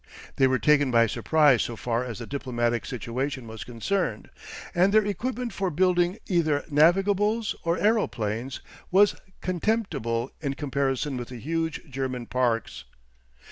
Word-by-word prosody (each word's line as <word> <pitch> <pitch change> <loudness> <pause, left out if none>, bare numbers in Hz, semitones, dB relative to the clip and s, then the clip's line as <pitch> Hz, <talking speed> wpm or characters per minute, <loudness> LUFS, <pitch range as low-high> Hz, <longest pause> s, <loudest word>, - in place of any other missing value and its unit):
They 135 - +5
were 130 0 +2
taken 145 0 +3
by 115 -1 +5
surprise 145 +2 +3
so 120 - -3
far 120 +1 -1
as 120 -4 -6
the - - -6
diplomatic 120 -4 -2
situation 125 +1 -4
was 110 -1 -7
concerned, 175 - -2 0.4
and 185 +1 +3
their 215 0 +4
equipment 240 +4 -3
for 195 -2 -1
building 180 +2 +2
either 155 -6 +1
navigables 200 +8 +3
or 170 +1 +1
aeroplanes 130 - 0 0.3
was 200 +2 +5 0.3
contemptible 170 - -1
in 140 -3 -2
comparison 140 -1 -1
with 120 -1 -5
the 125 - -8
huge 160 +6 -2
German 130 -3 -4
parks. 120 -2 -1
145 Hz, 140 wpm, -26 LUFS, 125-185 Hz, 0.4 s, They